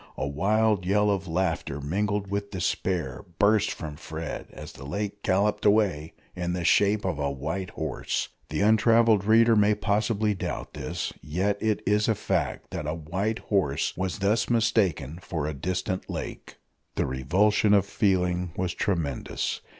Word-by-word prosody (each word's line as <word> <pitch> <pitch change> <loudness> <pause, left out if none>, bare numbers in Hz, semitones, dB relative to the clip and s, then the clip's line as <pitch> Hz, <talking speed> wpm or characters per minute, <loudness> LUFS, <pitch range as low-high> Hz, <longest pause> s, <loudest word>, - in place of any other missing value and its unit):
A - - -1
wild 105 +6 +2
yell 105 +3 +2
of 95 -2 -2
laughter 85 -4 -1
mingled 100 +6 -1
with 100 0 -2
despair 90 - -2
burst 105 0 +4
from 75 -3 -6
Fred 80 0 -6
as - - -9
the 70 - -12
lake 100 +7 -4
galloped 100 +3 +1
away 100 -7 +2 0.2
in 90 0 -2
the 90 -1 -2
shape 105 0 +3
of 85 -6 -1
a 70 -1 0
white 80 +7 -4
horse! - - -3 0.2
The - - -1
untravelled 110 0 +4
reader 115 +1 +5
may 105 0 +4
possibly 105 +1 +1
doubt 95 - -5
this. - - -4
Yet 95 +6 -1
it 110 -1 0
is 105 +1 +2
a 110 - +2
fact - - -2
that 75 - -4
a 75 - -1
white 95 +8 -2 0.2
horse 90 -9 +1
was 95 +1 -2
thus 105 +3 +1
mistaken 95 - +1
for 80 -6 -3
a 75 - -2
distant 90 +5 -3
lake! - - -6 0.4
The - - +1
revulsion 100 +11 +2
of 100 -1 +3
feeling 90 -4 0
was 90 -1 -1
tremendous. 85 - -2
95 Hz, 160 wpm, -26 LUFS, 80-105 Hz, 0.4 s, reader